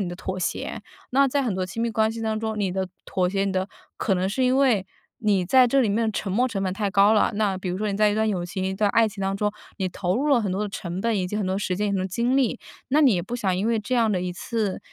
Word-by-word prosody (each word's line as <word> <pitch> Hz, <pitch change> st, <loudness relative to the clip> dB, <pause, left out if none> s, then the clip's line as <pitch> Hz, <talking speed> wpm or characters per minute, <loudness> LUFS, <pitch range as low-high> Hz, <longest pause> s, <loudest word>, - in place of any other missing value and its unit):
你 185 Hz, -, -1 dB
的 175 Hz, -, -6 dB
妥 190 Hz, +1 st, -4 dB
协。 -, -, -3 dB, 0.3 s
那 275 Hz, +2 st, +4 dB
在 280 Hz, +2 st, 0 dB
很 220 Hz, -, -1 dB
多 185 Hz, 0 st, -1 dB
亲 195 Hz, +5 st, -6 dB
密 235 Hz, -, +1 dB
关 220 Hz, 0 st, +2 dB
系 225 Hz, 0 st, -6 dB
当 220 Hz, -1 st, -1 dB
中， 220 Hz, -1 st, -3 dB
你 195 Hz, -3 st, 0 dB
的 190 Hz, -1 st, -2 dB, 0.2 s
妥 180 Hz, -1 st, 0 dB
协 195 Hz, +1 st, 0 dB
你 195 Hz, -, -1 dB
的 190 Hz, +1 st, -1 dB, 0.3 s
可 195 Hz, -, 0 dB
能 185 Hz, +1 st, 0 dB
是 235 Hz, +7 st, -1 dB
因 255 Hz, +1 st, +3 dB
为， 250 Hz, -9 st, +3 dB, 0.3 s
你 205 Hz, -6 st, +1 dB
在 255 Hz, +4 st, +6 dB
这 270 Hz, +3 st, +3 dB
里 235 Hz, -, +2 dB
面 220 Hz, +1 st, +1 dB
沉 195 Hz, -, -3 dB
没 245 Hz, +7 st, +2 dB
成 195 Hz, -4 st, -3 dB
本 185 Hz, -, 0 dB
太 205 Hz, -1 st, -1 dB
高 200 Hz, +2 st, +5 dB
了。 215 Hz, -, +3 dB
那 205 Hz, -3 st, +1 dB
比 185 Hz, -1 st, -4 dB
如 180 Hz, -, -3 dB
说 210 Hz, 0 st, -1 dB
你 195 Hz, -, -2 dB
在 210 Hz, 0 st, +4 dB
一 -, -, -1 dB
段 220 Hz, 0 st, +1 dB
友 180 Hz, -4 st, -1 dB
情、 185 Hz, +1 st, -4 dB
一 190 Hz, -, -2 dB
段 205 Hz, +1 st, +1 dB
爱 225 Hz, 0 st, +4 dB
情 200 Hz, -2 st, -7 dB
当 195 Hz, 0 st, 0 dB
中， 210 Hz, +1 st, 0 dB, 0.3 s
你 190 Hz, -2 st, 0 dB
投 180 Hz, 0 st, -2 dB
入 285 Hz, +4 st, 0 dB
了 275 Hz, -4 st, +4 dB
很 200 Hz, -, -1 dB
多 195 Hz, -, -2 dB
的 210 Hz, -, -2 dB
成 180 Hz, -2 st, -5 dB
本， 230 Hz, +1 st, +1 dB
以 185 Hz, -2 st, 0 dB
及 195 Hz, -, -6 dB
很 200 Hz, -, -1 dB
多 185 Hz, -, 0 dB
时 185 Hz, -2 st, -1 dB
间、 210 Hz, +2 st, 0 dB
很 200 Hz, -, 0 dB
多 185 Hz, -, -1 dB
精 235 Hz, +7 st, 0 dB
力， 255 Hz, -2 st, +1 dB, 0.3 s
那 290 Hz, +4 st, +3 dB
你 270 Hz, -8 st, +5 dB
也 175 Hz, -, -1 dB
不 235 Hz, +6 st, -6 dB
想 195 Hz, -6 st, 0 dB
因 195 Hz, +4 st, -1 dB
为 230 Hz, -1 st, +2 dB
这 215 Hz, +5 st, -2 dB
样 225 Hz, -3 st, +3 dB
的 180 Hz, -, 0 dB
一 180 Hz, -, -2 dB
次 205 Hz, +2 st, -2 dB
205 Hz, 340 characters per minute, -24 LUFS, 190-230 Hz, 0.3 s, 在